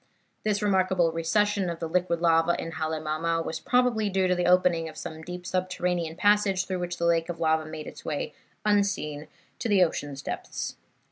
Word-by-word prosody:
"This 210 Hz, -1 st, 0 dB
remarkable 185 Hz, -4 st, +3 dB
recession 195 Hz, +4 st, +1 dB
of 170 Hz, -1 st, -4 dB
the 165 Hz, -, -3 dB
liquid 170 Hz, 0 st, 0 dB
lava 165 Hz, 0 st, +3 dB
in 165 Hz, -, -4 dB
Halemaumau 160 Hz, +1 st, -1 dB
was -, -, -3 dB
probably 245 Hz, -4 st, +2 dB
due 190 Hz, -1 st, +2 dB
to 180 Hz, -, +3 dB
the 180 Hz, 0 st, 0 dB
opening 180 Hz, -2 st, +3 dB
of 155 Hz, -, -12 dB
some 160 Hz, 0 st, -6 dB
deep 180 Hz, +2 st, -7 dB
subterranean 180 Hz, -3 st, -1 dB
passage 205 Hz, -1 st, +3 dB
through 185 Hz, -1 st, -3 dB
which 175 Hz, 0 st, -3 dB
the 170 Hz, -, -1 dB
lake 165 Hz, 0 st, +2 dB
of 170 Hz, -1 st, -4 dB
lava 160 Hz, -1 st, +2 dB
made 155 Hz, -1 st, -7 dB
its -, -, -10 dB
way 150 Hz, -2 st, -3 dB, 0.3 s
unseen 200 Hz, -8 st, +1 dB, 0.3 s
to 235 Hz, -, -2 dB
the 195 Hz, -3 st, +6 dB
ocean's 145 Hz, -4 st, -3 dB
depths. -, -, -4 dB
175 Hz, 185 wpm, -27 LUFS, 160-190 Hz, 0.3 s, the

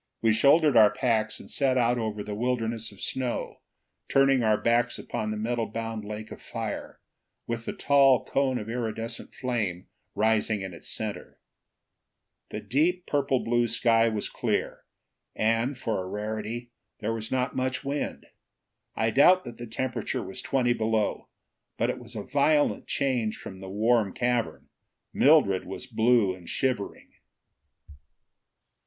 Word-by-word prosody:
We 115 Hz, -1 st, +5 dB
shouldered 145 Hz, +4 st, +5 dB
our 110 Hz, -2 st, +8 dB
packs 110 Hz, 0 st, 0 dB
and -, -, -12 dB
set 135 Hz, -2 st, +1 dB
out 120 Hz, 0 st, +2 dB
over 105 Hz, -2 st, -3 dB
the 105 Hz, -, -5 dB
wilderness 115 Hz, -1 st, -2 dB
of 100 Hz, -, -15 dB
snow, 130 Hz, -2 st, -3 dB, 0.5 s
turning 135 Hz, -1 st, +4 dB
our 110 Hz, -2 st, +3 dB
backs 120 Hz, +1 st, +2 dB
upon 110 Hz, -, -4 dB
the 110 Hz, -, -3 dB
metal 115 Hz, +1 st, -1 dB
bound 115 Hz, -1 st, -4 dB
lake 105 Hz, +1 st, -7 dB
of -, -, -9 dB
fire, -, -, -5 dB, 0.5 s
with 115 Hz, 0 st, -4 dB
the -, -, -3 dB
tall 135 Hz, -2 st, +4 dB
cone 135 Hz, -2 st, +1 dB
of 105 Hz, -3 st, -5 dB
iridescent 115 Hz, 0 st, -4 dB
flame 110 Hz, -9 st, -2 dB, 0.3 s
rising 110 Hz, -1 st, +1 dB
in 95 Hz, -2 st, -6 dB
its 85 Hz, -, -10 dB
center. 110 Hz, -2 st, -5 dB, 1.1 s
The -, -, -5 dB
deep, 160 Hz, -, +1 dB
purple 135 Hz, -3 st, +1 dB
blue 120 Hz, 0 st, +2 dB
sky 115 Hz, 0 st, +3 dB
was 110 Hz, -2 st, -2 dB
clear, -, -, -2 dB, 0.5 s
and, 115 Hz, +5 st, +1 dB
for 110 Hz, -6 st, -2 dB
a -, -, -7 dB
rarity, 110 Hz, +3 st, -4 dB, 0.3 s
there 110 Hz, +2 st, -2 dB
was 110 Hz, -1 st, -5 dB
not 130 Hz, 0 st, 0 dB
much 130 Hz, +1 st, -2 dB
wind. 140 Hz, +1 st, -3 dB, 0.7 s
I 110 Hz, 0 st, +1 dB
doubt 180 Hz, +9 st, +6 dB
that 120 Hz, -1 st, -9 dB
the 120 Hz, -, -6 dB
temperature 125 Hz, +3 st, -3 dB
was 95 Hz, -, -6 dB
twenty 125 Hz, -3 st, +1 dB
below. 110 Hz, -2 st, -1 dB, 0.5 s
But -, -, +1 dB
it -, -, -7 dB
was -, -, -12 dB
a -, -, -4 dB
violent 145 Hz, +2 st, +2 dB
change 125 Hz, -6 st, 0 dB
from 95 Hz, -1 st, -9 dB
the 95 Hz, 0 st, -8 dB
warm 110 Hz, 0 st, +2 dB
cavern. 120 Hz, -1 st, -1 dB, 0.4 s
Mildred 135 Hz, -11 st, +4 dB
was 95 Hz, +6 st, -6 dB
blue 115 Hz, -4 st, +3 dB
and 90 Hz, -2 st, -12 dB
shivering. 125 Hz, -6 st, -2 dB
115 Hz, 150 wpm, -27 LUFS, 110-130 Hz, 1.1 s, our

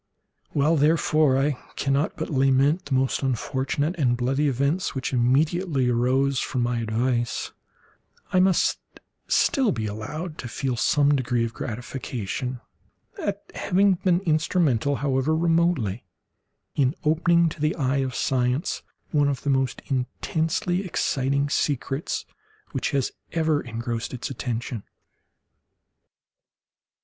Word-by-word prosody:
While, 155 Hz, +3 st, +2 dB
therefore, 155 Hz, -2 st, +3 dB
I 140 Hz, +2 st, +2 dB, 0.2 s
cannot 140 Hz, +2 st, 0 dB
but -, -, -4 dB
lament 135 Hz, +5 st, +3 dB
the 135 Hz, -, -1 dB
most 130 Hz, 0 st, +1 dB
unfortunate 135 Hz, +4 st, -1 dB
and 120 Hz, -4 st, +2 dB
bloody 135 Hz, +4 st, +1 dB
events 140 Hz, +7 st, 0 dB
which 130 Hz, 0 st, -3 dB
immediately 135 Hz, +3 st, +2 dB
arose 130 Hz, +3 st, +2 dB
from 125 Hz, -2 st, -1 dB
my 120 Hz, 0 st, 0 dB
advice, 120 Hz, +2 st, -1 dB, 0.8 s
I 185 Hz, -, +5 dB
must 185 Hz, -1 st, +3 dB, 0.5 s
still 265 Hz, -6 st, +3 dB
be 110 Hz, -4 st, -2 dB
allowed 150 Hz, -, -5 dB
to 120 Hz, -, -5 dB
feel 125 Hz, +2 st, -2 dB
some 145 Hz, +3 st, +3 dB
degree 125 Hz, -3 st, 0 dB
of 115 Hz, -, -5 dB
gratification 125 Hz, 0 st, -4 dB, 0.6 s
at -, -, -2 dB
having 195 Hz, +2 st, +3 dB
been 180 Hz, 0 st, +1 dB
instrumental, 155 Hz, -, +1 dB
however 140 Hz, +2 st, +1 dB
remotely, 165 Hz, -, +1 dB, 0.7 s
in 135 Hz, +2 st, +1 dB
opening 170 Hz, +2 st, +3 dB
to 150 Hz, -, -9 dB
the 155 Hz, +1 st, +1 dB
eye 135 Hz, -3 st, 0 dB
of 130 Hz, -2 st, -1 dB
science 125 Hz, +4 st, 0 dB, 0.3 s
one 145 Hz, -2 st, +3 dB
of 140 Hz, -2 st, -2 dB
the 145 Hz, -, +1 dB
most 135 Hz, -2 st, 0 dB
intensely 160 Hz, +7 st, -1 dB
exciting 140 Hz, -5 st, 0 dB
secrets 140 Hz, 0 st, -1 dB, 0.5 s
which -, -, -1 dB
has 140 Hz, -4 st, 0 dB, 0.2 s
ever 160 Hz, -3 st, +2 dB
engrossed 115 Hz, 0 st, -4 dB
its 125 Hz, -, -5 dB
attention. 120 Hz, -2 st, -3 dB
135 Hz, 120 wpm, -25 LUFS, 125-155 Hz, 0.8 s, I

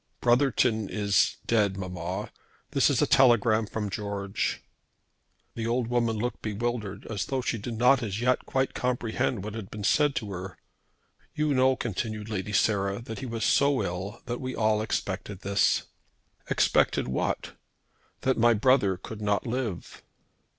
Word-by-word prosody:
"Brotherton 120 Hz, -4 st, +2 dB
is 100 Hz, -2 st, +2 dB
dead, 105 Hz, -4 st, +2 dB
mamma. 90 Hz, -1 st, -4 dB, 0.4 s
This -, -, +3 dB
is -, -, +2 dB
a -, -, +4 dB
telegram 115 Hz, -4 st, +4 dB
from 105 Hz, 0 st, -3 dB
George." 100 Hz, -1 st, -3 dB, 0.9 s
The 115 Hz, -1 st, -3 dB
old 120 Hz, 0 st, 0 dB
woman 120 Hz, -2 st, +1 dB
looked 120 Hz, +3 st, -3 dB
bewildered, 110 Hz, -2 st, -3 dB
as 105 Hz, -4 st, -3 dB
though 135 Hz, -1 st, -1 dB
she 115 Hz, -, -1 dB
did 115 Hz, +3 st, -5 dB
not 125 Hz, +3 st, +4 dB
as 105 Hz, -2 st, -3 dB
yet 125 Hz, +1 st, +1 dB
quite 130 Hz, 0 st, 0 dB
comprehend 120 Hz, -3 st, -1 dB
what 105 Hz, 0 st, -5 dB
had 110 Hz, -4 st, -6 dB
been 105 Hz, -1 st, -7 dB
said 145 Hz, +5 st, +3 dB
to 105 Hz, -3 st, -3 dB
her. 95 Hz, -1 st, -6 dB, 0.8 s
"You 150 Hz, -1 st, +1 dB
know," 130 Hz, 0 st, +4 dB
continued 110 Hz, -1 st, -4 dB
Lady 105 Hz, -1 st, -3 dB
Sarah, 100 Hz, 0 st, +1 dB
"that 110 Hz, -2 st, -7 dB
he 130 Hz, -, -5 dB
was 115 Hz, -2 st, -2 dB
so 140 Hz, -1 st, +3 dB
ill 95 Hz, +5 st, -5 dB
that 120 Hz, 0 st, -4 dB
we 130 Hz, 0 st, -4 dB
all 110 Hz, -1 st, +2 dB
expected 100 Hz, -2 st, -3 dB
this." 100 Hz, 0 st, +2 dB, 0.7 s
"Expected -, -, +2 dB
what?" 65 Hz, -, -2 dB, 0.7 s
"That 130 Hz, -2 st, +1 dB
my 120 Hz, 0 st, +5 dB
brother 105 Hz, -4 st, +3 dB
could 110 Hz, +3 st, -9 dB
not 100 Hz, -2 st, 0 dB
live." 115 Hz, -6 st, -4 dB
110 Hz, 155 wpm, -27 LUFS, 100-120 Hz, 0.9 s, my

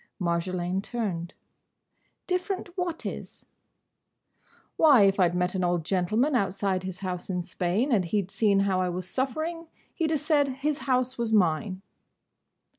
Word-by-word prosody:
Marjolaine 180 Hz, +1 st, -1 dB
turned. 195 Hz, -7 st, -4 dB, 0.9 s
"Different 365 Hz, -1 st, -2 dB
what 355 Hz, -3 st, -3 dB
is?" -, -, -7 dB, 1.3 s
"Why, 280 Hz, -9 st, +6 dB
if 195 Hz, 0 st, +3 dB
I 180 Hz, -2 st, +5 dB
'd 175 Hz, -, -5 dB
met 180 Hz, 0 st, 0 dB
an 185 Hz, -1 st, -1 dB
old 175 Hz, -2 st, 0 dB
gentleman 215 Hz, -, +1 dB
outside 195 Hz, -3 st, 0 dB
his 185 Hz, 0 st, -6 dB
house 180 Hz, -1 st, -4 dB
in 180 Hz, -2 st, -1 dB
Spain, 185 Hz, +11 st, -1 dB
and 200 Hz, -6 st, +3 dB
he 200 Hz, +4 st, 0 dB
'd 190 Hz, -, -14 dB
seen 200 Hz, -3 st, +3 dB
how 190 Hz, -2 st, +1 dB
I 180 Hz, -, 0 dB
was 180 Hz, 0 st, -4 dB
suffering, 315 Hz, -, -2 dB, 0.3 s
he 330 Hz, -, 0 dB
'd -, -, -2 dB
have 310 Hz, -2 st, +1 dB
said 295 Hz, -1 st, +2 dB
his 275 Hz, +3 st, -2 dB
house 255 Hz, 0 st, +1 dB
was 235 Hz, -2 st, -1 dB
mine." 185 Hz, 0 st, +1 dB
200 Hz, 160 wpm, -27 LUFS, 180-270 Hz, 1.3 s, Why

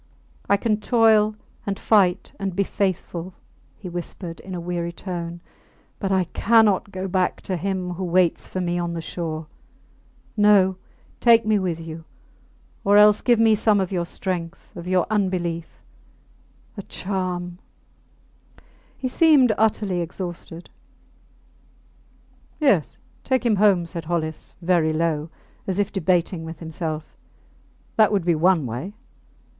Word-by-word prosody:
I 200 Hz, -, +5 dB
can 215 Hz, 0 st, 0 dB
toil, 215 Hz, -2 st, +3 dB, 0.3 s
and 200 Hz, -1 st, -3 dB
fight 195 Hz, -4 st, +2 dB
and 195 Hz, -2 st, -3 dB
be 200 Hz, -, +2 dB
faithful, 185 Hz, -2 st, -3 dB, 0.4 s
he 195 Hz, -, -9 dB
whispered, 175 Hz, 0 st, -6 dB
in 190 Hz, -1 st, -8 dB
a -, -, -4 dB
weary 170 Hz, 0 st, -3 dB
tone, 170 Hz, -1 st, -6 dB, 0.6 s
but 195 Hz, -2 st, -2 dB
I 190 Hz, -1 st, +3 dB
cannot 205 Hz, +1 st, +3 dB
go 190 Hz, 0 st, -4 dB
back 185 Hz, -1 st, 0 dB
to 185 Hz, -, -3 dB
him 185 Hz, 0 st, -2 dB
who 180 Hz, +2 st, -5 dB
waits 180 Hz, -1 st, +1 dB
for 185 Hz, -, -4 dB
me 175 Hz, -1 st, -1 dB
on 170 Hz, -1 st, -2 dB
the 170 Hz, -, -4 dB
shore. 160 Hz, -1 st, -5 dB, 0.9 s
No! 205 Hz, -3 st, +5 dB, 0.4 s
Take 230 Hz, -2 st, +5 dB
me 215 Hz, -1 st, +3 dB
with 175 Hz, -3 st, -2 dB
you... 165 Hz, 0 st, -8 dB, 0.8 s
Or 200 Hz, +1 st, +5 dB
else 210 Hz, 0 st, +6 dB
give 240 Hz, -2 st, +3 dB
me 225 Hz, 0 st, +5 dB
some 215 Hz, -1 st, +3 dB
of 190 Hz, -1 st, -1 dB
your 175 Hz, -2 st, -1 dB
strength 175 Hz, -3 st, -5 dB
of 175 Hz, 0 st, -8 dB
your 185 Hz, -1 st, +2 dB
unbelief.... 180 Hz, -5 st, -2 dB, 0.9 s
A -, -, -4 dB
charm!... 180 Hz, -2 st, -4 dB, 1.4 s
He 260 Hz, -, -3 dB
seemed 270 Hz, -4 st, +5 dB
utterly 205 Hz, -4 st, +1 dB
exhausted. 175 Hz, -1 st, -7 dB, 1.9 s
Yes, 210 Hz, -, +2 dB, 0.3 s
take 260 Hz, -1 st, 0 dB
him 220 Hz, -3 st, +3 dB
home, 195 Hz, -4 st, +4 dB
said 170 Hz, -1 st, -6 dB
Hollis, 160 Hz, -2 st, -3 dB
very 165 Hz, -3 st, +2 dB
low, 155 Hz, -1 st, -1 dB, 0.4 s
as 190 Hz, -1 st, -1 dB
if 205 Hz, 0 st, 0 dB
debating 180 Hz, -2 st, 0 dB
with 160 Hz, 0 st, -7 dB
himself. 160 Hz, -1 st, -5 dB, 0.8 s
That 215 Hz, -1 st, +5 dB
would 195 Hz, -5 st, 0 dB
be 175 Hz, -, +3 dB
one 165 Hz, -1 st, +3 dB
way. 125 Hz, -, -5 dB
185 Hz, 140 wpm, -23 LUFS, 170-205 Hz, 1.9 s, else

